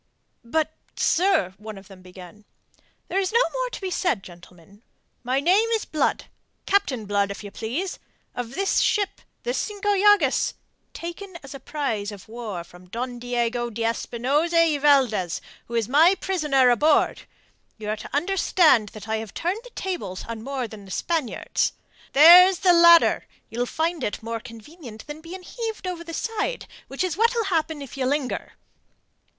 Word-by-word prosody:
"But, 315 Hz, +6 st, -1 dB, 0.2 s
sir..." 355 Hz, -, +2 dB
one 215 Hz, -1 st, -8 dB
of 195 Hz, 0 st, -13 dB
them 195 Hz, -2 st, -14 dB
began. 185 Hz, +3 st, -13 dB, 0.6 s
"There 385 Hz, -, 0 dB
is 380 Hz, -2 st, -1 dB
no 470 Hz, +2 st, +4 dB
more -, -, -2 dB
to -, -, -7 dB
be 380 Hz, -2 st, -4 dB
said, 290 Hz, -, 0 dB
gentlemen. 175 Hz, +2 st, -16 dB, 0.4 s
My 255 Hz, +2 st, 0 dB
name 380 Hz, +10 st, +3 dB
is 440 Hz, -, -3 dB
Blood 310 Hz, -, -1 dB, 0.4 s
Captain 285 Hz, -, +1 dB
Blood, 200 Hz, 0 st, 0 dB
if 200 Hz, +1 st, -7 dB
you 205 Hz, -, -8 dB
please, 295 Hz, -, -4 dB, 0.3 s
of 245 Hz, +1 st, -6 dB
this 390 Hz, +1 st, +1 dB
ship 400 Hz, -2 st, 0 dB, 0.2 s
the -, -, -1 dB
Cinco 415 Hz, -3 st, -2 dB
Llagas, 415 Hz, +1 st, +3 dB, 0.4 s
taken 345 Hz, +2 st, -7 dB
as 275 Hz, -, -10 dB
a 275 Hz, -, -8 dB
prize 235 Hz, -8 st, -3 dB
of 200 Hz, -2 st, -11 dB
war 215 Hz, -6 st, -6 dB
from 180 Hz, +1 st, -17 dB
Don 245 Hz, +3 st, -5 dB
Diego 240 Hz, 0 st, -1 dB
de 230 Hz, 0 st, -4 dB
Espinosa 260 Hz, +8 st, 0 dB
y 325 Hz, -3 st, +4 dB
Valdez, 250 Hz, -, +3 dB, 0.3 s
who 235 Hz, -, -6 dB
is 230 Hz, -3 st, +1 dB
my 320 Hz, +8 st, +5 dB
prisoner 300 Hz, -10 st, +2 dB
aboard. 295 Hz, +5 st, +2 dB, 0.5 s
You 215 Hz, -1 st, -6 dB
are 215 Hz, -, -1 dB
to -, -, -9 dB
understand 315 Hz, -, +3 dB
that 215 Hz, 0 st, -9 dB
I 220 Hz, 0 st, 0 dB
have 220 Hz, -1 st, -7 dB
turned 365 Hz, +6 st, -2 dB
the -, -, -12 dB
tables 345 Hz, -, -5 dB
on 230 Hz, -1 st, -6 dB
more 265 Hz, 0 st, -3 dB
than 210 Hz, -2 st, -11 dB
the -, -, -14 dB
Spaniards. 310 Hz, -, -1 dB, 0.4 s
There's 355 Hz, +6 st, +9 dB
the 360 Hz, -, +7 dB
ladder. 340 Hz, 0 st, +6 dB, 0.2 s
You'll 240 Hz, +2 st, -2 dB
find 325 Hz, 0 st, -2 dB
it 210 Hz, -, -3 dB
more 230 Hz, 0 st, -4 dB
convenient 230 Hz, +1 st, -12 dB
than 295 Hz, +2 st, -8 dB
being 360 Hz, +3 st, -9 dB
heaved 445 Hz, 0 st, -6 dB
over 360 Hz, -2 st, -4 dB
the 335 Hz, -1 st, -7 dB
side, 455 Hz, +5 st, -3 dB, 0.2 s
which 275 Hz, +6 st, -3 dB
is 360 Hz, -3 st, -1 dB
what'll 465 Hz, +1 st, +2 dB
happen 315 Hz, -2 st, -1 dB
if 275 Hz, -, -10 dB
you 260 Hz, -2 st, -1 dB
linger." 280 Hz, -1 st, -2 dB
275 Hz, 170 wpm, -24 LUFS, 220-355 Hz, 0.6 s, There's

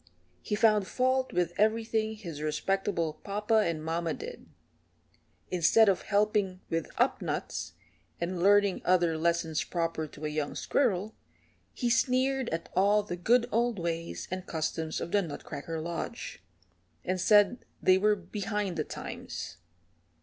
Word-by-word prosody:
He 210 Hz, -, -2 dB
found 215 Hz, -2 st, +4 dB
fault 260 Hz, +3 st, +1 dB
with 175 Hz, -1 st, 0 dB
everything 220 Hz, 0 st, +1 dB
his 170 Hz, -9 st, -7 dB
respectable 165 Hz, 0 st, -1 dB
papa 210 Hz, +2 st, +1 dB
and 165 Hz, -6 st, -1 dB
mama 165 Hz, +1 st, -1 dB
did. 480 Hz, +3 st, -8 dB, 1.0 s
Instead 185 Hz, +5 st, +5 dB
of 190 Hz, -, +1 dB
helping 205 Hz, -2 st, +1 dB
with 165 Hz, 0 st, -1 dB
up -, -, +2 dB
nuts -, -, -3 dB, 0.5 s
and 170 Hz, +1 st, -2 dB
learning 200 Hz, 0 st, +4 dB
other 175 Hz, -3 st, +3 dB
lessons 165 Hz, -1 st, 0 dB
proper 165 Hz, -2 st, -2 dB
to 150 Hz, +1 st, -9 dB
a -, -, 0 dB
young 150 Hz, -1 st, -2 dB
squirrel, 215 Hz, -5 st, 0 dB, 0.6 s
he 245 Hz, -, -1 dB
sneered 260 Hz, +1 st, +2 dB
at 165 Hz, +1 st, -3 dB
all 205 Hz, +2 st, +4 dB
the 190 Hz, -4 st, -4 dB
good 235 Hz, +7 st, +3 dB
old 235 Hz, 0 st, +1 dB
ways 170 Hz, -1 st, -3 dB
and 185 Hz, 0 st, -4 dB
customs 160 Hz, 0 st, -2 dB
of 170 Hz, -, -5 dB
the 205 Hz, -, +3 dB
Nutcracker 160 Hz, -1 st, -6 dB
Lodge, 165 Hz, -, -5 dB, 0.6 s
and 185 Hz, 0 st, -1 dB
said 210 Hz, +4 st, +5 dB, 0.2 s
they 185 Hz, 0 st, +5 dB
were 210 Hz, +1 st, +4 dB
behind 200 Hz, 0 st, -3 dB
the -, -, +1 dB
times. -, -, -7 dB
190 Hz, 140 wpm, -29 LUFS, 165-215 Hz, 1.0 s, Instead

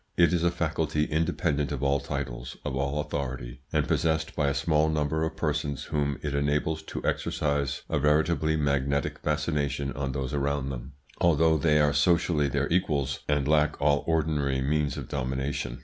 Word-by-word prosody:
It 85 Hz, 0 st, +5 dB
is 85 Hz, -1 st, +1 dB
a 85 Hz, -, +4 dB
faculty 80 Hz, -2 st, -1 dB
independent 75 Hz, -2 st, 0 dB
of 70 Hz, -2 st, -3 dB
all 70 Hz, 0 st, +2 dB
titles, 65 Hz, -3 st, -5 dB
of 70 Hz, -3 st, -2 dB
all 70 Hz, +2 st, 0 dB
authority, 65 Hz, -5 st, -5 dB
and -, -, +1 dB
possessed 80 Hz, -1 st, 0 dB
by 75 Hz, -3 st, +1 dB
a 70 Hz, -, +1 dB
small 75 Hz, +2 st, +2 dB
number 80 Hz, 0 st, 0 dB
of 80 Hz, 0 st, -2 dB
persons 75 Hz, -3 st, -2 dB
whom 70 Hz, -2 st, -1 dB
it 75 Hz, -2 st, -2 dB
enables 75 Hz, +2 st, 0 dB
to 80 Hz, -, -6 dB
exercise 70 Hz, -2 st, -1 dB
a -, -, 0 dB
veritably 80 Hz, +2 st, +2 dB
magnetic 70 Hz, -1 st, 0 dB
fascination 70 Hz, -2 st, -1 dB
on 70 Hz, -1 st, -3 dB
those 70 Hz, 0 st, -3 dB
around 70 Hz, -1 st, -1 dB
them, 65 Hz, +2 st, -7 dB, 0.3 s
although 80 Hz, -1 st, +4 dB
they 75 Hz, 0 st, +3 dB
are 75 Hz, -1 st, +3 dB
socially 80 Hz, 0 st, +3 dB
their 65 Hz, -, 0 dB
equals, 75 Hz, -6 st, 0 dB
and 75 Hz, -2 st, +1 dB
lack 75 Hz, 0 st, +2 dB
all 70 Hz, 0 st, +2 dB
ordinary 75 Hz, -4 st, +1 dB
means 75 Hz, +2 st, 0 dB
of -, -, -6 dB
domination. 65 Hz, -1 st, -3 dB
75 Hz, 170 wpm, -27 LUFS, 70-80 Hz, 0.3 s, It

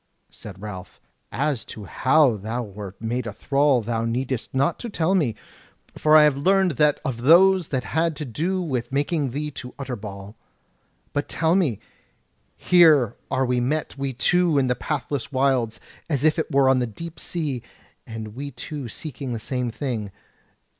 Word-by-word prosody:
Said 95 Hz, -3 st, -10 dB
Ralph: 95 Hz, -3 st, -8 dB, 0.3 s
"As 140 Hz, -4 st, -1 dB
to 105 Hz, -, -9 dB
how 130 Hz, -, +3 dB
thou 110 Hz, +4 st, -4 dB
wert 100 Hz, -2 st, -9 dB
made 115 Hz, +2 st, -2 dB
a 105 Hz, -, -5 dB
thrall 135 Hz, +3 st, +2 dB
thou 115 Hz, 0 st, -1 dB
needest 125 Hz, +1 st, -2 dB
not 140 Hz, +5 st, +1 dB
to 240 Hz, -, -5 dB
tell 175 Hz, -2 st, 0 dB
me; 145 Hz, -, +1 dB, 0.6 s
for 155 Hz, 0 st, +5 dB
I 155 Hz, -, +8 dB
have 150 Hz, -2 st, +4 dB
learned 190 Hz, +4 st, +3 dB
that 150 Hz, 0 st, +3 dB
of 120 Hz, -3 st, -3 dB
those 180 Hz, +5 st, +6 dB
that 130 Hz, -3 st, -2 dB
had 160 Hz, 0 st, 0 dB
to 150 Hz, -, -5 dB
do 175 Hz, -, -1 dB
with 125 Hz, -7 st, -2 dB
taking 145 Hz, +1 st, 0 dB
thee 150 Hz, +4 st, -4 dB
to 125 Hz, -2 st, -9 dB
Utterbol. 105 Hz, -7 st, -7 dB, 0.8 s
But 145 Hz, -, -2 dB
tell 160 Hz, 0 st, +1 dB
me; 165 Hz, -, +2 dB, 0.8 s
here 160 Hz, -, +5 dB
are 130 Hz, 0 st, +1 dB
met 125 Hz, +5 st, -1 dB
we 135 Hz, -1 st, -3 dB
two 165 Hz, +7 st, +2 dB
in 135 Hz, -, +3 dB
the 125 Hz, -1 st, +1 dB
pathless 145 Hz, -2 st, -3 dB
wilds, 130 Hz, -4 st, +1 dB, 0.3 s
as 145 Hz, -4 st, 0 dB
if 155 Hz, +1 st, +3 dB
it -, -, -2 dB
were 135 Hz, -1 st, +4 dB
on 130 Hz, -1 st, +4 dB
the 125 Hz, -, 0 dB
deep 160 Hz, +9 st, -9 dB
sea, 150 Hz, -8 st, -3 dB, 0.5 s
and 110 Hz, -1 st, -6 dB
we 135 Hz, +7 st, -6 dB
two 140 Hz, -1 st, -7 dB
seeking 135 Hz, -1 st, -6 dB
the 115 Hz, -, -3 dB
same 125 Hz, +2 st, -2 dB
thing. 115 Hz, -5 st, -4 dB
135 Hz, 170 wpm, -23 LUFS, 115-155 Hz, 0.8 s, I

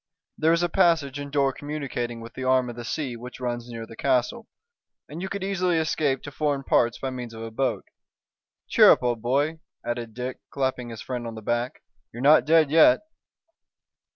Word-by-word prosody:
There 160 Hz, +1 st, +2 dB
is 170 Hz, +1 st, +2 dB
a -, -, +3 dB
passage 160 Hz, -6 st, +2 dB
and 140 Hz, 0 st, -6 dB
door 140 Hz, -2 st, +2 dB
communicating 135 Hz, -6 st, -4 dB
with 115 Hz, +1 st, -10 dB
the 130 Hz, -, -6 dB
arm 130 Hz, -1 st, +2 dB
of -, -, -11 dB
the 120 Hz, -, -7 dB
sea 130 Hz, +1 st, -3 dB
which 125 Hz, +2 st, -9 dB
runs 120 Hz, -1 st, -4 dB
near 115 Hz, -1 st, -6 dB
the 115 Hz, -, -12 dB
castle, 135 Hz, -, 0 dB, 0.6 s
and 155 Hz, +4 st, -8 dB
you 190 Hz, -, -4 dB
could 200 Hz, -1 st, -4 dB
easily 185 Hz, -3 st, +1 dB
escape 150 Hz, -4 st, 0 dB
to 145 Hz, -, -7 dB
foreign 145 Hz, -1 st, -1 dB
parts 120 Hz, -2 st, +2 dB
by 135 Hz, -, -4 dB
means 120 Hz, -3 st, -7 dB
of 110 Hz, -, -7 dB
a 115 Hz, -, -6 dB
boat. 130 Hz, +3 st, -1 dB, 0.8 s
Cheer -, -, +7 dB
up, -, -, +5 dB
old 120 Hz, -2 st, 0 dB
boy," 145 Hz, +7 st, 0 dB, 0.3 s
added 120 Hz, -2 st, -4 dB
Dick, 125 Hz, +1 st, -5 dB
clapping 130 Hz, -3 st, -2 dB
his 115 Hz, -2 st, -8 dB
friend 125 Hz, -2 st, -4 dB
on 115 Hz, -, -7 dB
the 110 Hz, -, -9 dB
back, 120 Hz, +3 st, -2 dB, 0.3 s
"you're 120 Hz, -, -9 dB
not 150 Hz, +3 st, +6 dB
dead 155 Hz, -2 st, +4 dB
yet." 305 Hz, -, +6 dB
130 Hz, 200 wpm, -25 LUFS, 120-155 Hz, 0.8 s, Cheer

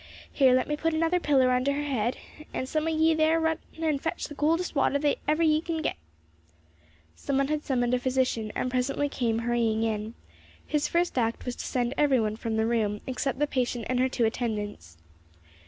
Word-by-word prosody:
Here, 260 Hz, -3 st, +5 dB
let 255 Hz, -, +1 dB
me 300 Hz, -, 0 dB
put 325 Hz, +1 st, -1 dB
another 330 Hz, +3 st, +2 dB
pillar 270 Hz, -6 st, +3 dB
under 255 Hz, +3 st, +2 dB
her 290 Hz, +1 st, -2 dB
head, 255 Hz, -4 st, -1 dB, 0.4 s
and 260 Hz, -, -2 dB
some 310 Hz, +3 st, -1 dB
o' -, -, +2 dB
ye 320 Hz, 0 st, +3 dB
there 315 Hz, +1 st, +3 dB
run 320 Hz, -1 st, 0 dB, 0.2 s
and 310 Hz, -4 st, 0 dB
fetch 325 Hz, +1 st, -3 dB
the -, -, -9 dB
coldest 325 Hz, +5 st, 0 dB
water 280 Hz, -1 st, +2 dB
that 290 Hz, 0 st, 0 dB
ever 305 Hz, +2 st, +2 dB
ye 310 Hz, -1 st, +3 dB
can 325 Hz, -1 st, -3 dB
git." -, -, -1 dB, 1.2 s
Some 275 Hz, -, -2 dB
one 275 Hz, 0 st, +1 dB
had 305 Hz, 0 st, -1 dB
summoned 245 Hz, -2 st, 0 dB
a 250 Hz, -, +2 dB
physician, 250 Hz, -4 st, 0 dB
and -, -, -1 dB
he 255 Hz, -, -2 dB
presently 270 Hz, +3 st, 0 dB
came 230 Hz, -5 st, -1 dB
hurrying 230 Hz, -1 st, 0 dB
in. 220 Hz, 0 st, -2 dB, 0.5 s
His 300 Hz, -1 st, 0 dB
first 345 Hz, -5 st, +1 dB
act 230 Hz, -1 st, -1 dB
was 250 Hz, -1 st, -3 dB
to -, -, -5 dB
send 245 Hz, 0 st, -1 dB
every 280 Hz, -4 st, +4 dB
one 215 Hz, -1 st, 0 dB
from 220 Hz, 0 st, -3 dB
the 220 Hz, -, +2 dB
room 215 Hz, -3 st, 0 dB
except 265 Hz, 0 st, -2 dB
the 295 Hz, -, +2 dB
patient 245 Hz, -4 st, -2 dB
and 255 Hz, 0 st, 0 dB
her 260 Hz, +1 st, +2 dB
two 245 Hz, -2 st, +1 dB
attendants. 210 Hz, -, -3 dB
260 Hz, 210 wpm, -27 LUFS, 235-300 Hz, 1.2 s, Here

